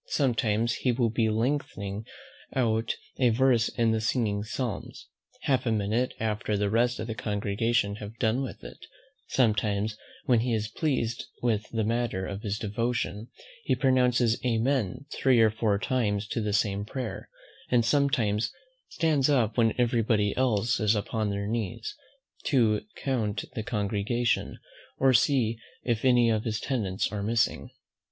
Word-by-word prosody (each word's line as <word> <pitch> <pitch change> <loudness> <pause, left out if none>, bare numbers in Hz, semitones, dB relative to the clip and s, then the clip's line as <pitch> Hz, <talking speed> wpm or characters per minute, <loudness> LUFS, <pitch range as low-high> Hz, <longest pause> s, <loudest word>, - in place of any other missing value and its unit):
Sometimes 115 -4 +1
he 125 - +1
will 120 -2 +1
be 115 -1 +1
lengthening 110 -3 -2 0.5
out 115 -3 +1 0.2
a 125 -2 +5
verse 120 0 +3
in 115 -1 +1
the 110 0 0
singing 110 -3 0
psalms, 115 -1 -5 0.4
half 130 -2 +1
a - - +2
minute 110 +4 0
after 105 -1 -1
the 100 0 0
rest 120 +2 +2
of 110 - -3
the 115 - -3
congregation 105 0 0
have 105 +1 -9
done 115 +2 +1
with 135 - -6
it; - - -10 0.5
sometimes, 105 -3 +1 0.3
when 120 -3 +4
he 120 0 0
is 110 0 -2
pleased 120 -3 -1 0.2
with 110 -3 0
the 115 -1 -1
matter 115 -4 -1
of 100 +1 -5
his 105 -1 -2
devotion, 115 0 -2 0.4
he - - +1
pronounces 125 -3 +2
Amen 125 -1 0
three 130 -3 +3
or 110 -1 +5
four 110 -2 +1
times 105 -3 0
to 115 - -1
the 105 -1 -1
same 100 -1 +1
prayer; 120 +2 -5 0.4
and 120 -2 +3
sometimes 125 -5 +2 0.4
stands 150 -5 +2
up 115 -6 +2
when 115 -2 +3
every 120 -1 +2
body 105 -2 +1
else 120 -2 +1
is 105 -1 +3
upon 110 +1 -1
their 100 0 -2
knees, 115 - -3 0.5
to 115 -7 +3
count 110 -7 -2
the 120 - -3
congregation, 105 +2 -1 0.4
or 135 -1 +4
see 115 -3 +2 0.2
if 115 -3 -1
any 120 -3 +5
of 110 -1 0
his 110 -1 -2
tenants 105 -8 -1
are 105 -1 -3
missing. 110 +2 0
115 Hz, 155 wpm, -28 LUFS, 105-125 Hz, 0.5 s, a